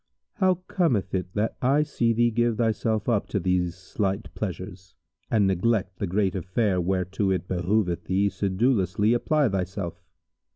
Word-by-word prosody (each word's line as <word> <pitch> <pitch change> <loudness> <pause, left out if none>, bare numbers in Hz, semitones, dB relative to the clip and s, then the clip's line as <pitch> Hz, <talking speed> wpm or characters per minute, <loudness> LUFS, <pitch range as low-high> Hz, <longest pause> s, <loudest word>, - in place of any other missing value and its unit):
How 185 -2 +2
cometh 150 - 0
it 90 -1 -2
that 105 +2 -1
I 140 +4 +3
see 120 -6 0
thee 120 +1 +2
give 120 0 +1
thyself 110 -2 0
up 115 -5 +1
to 100 - -1
these 90 -1 0
slight 95 +2 -3
pleasures 95 -2 -6 0.3
and 105 -3 +3
neglect 95 0 0
the 100 - -1
great 95 +1 +1
affair 95 +1 0
whereto 95 +2 0
it 95 -1 -1
behoveth 90 0 0
thee 95 +2 +2
sedulously 100 +1 +1
apply 150 +4 +2
thyself? 95 -2 -3
100 Hz, 150 wpm, -26 LUFS, 95-115 Hz, 0.3 s, I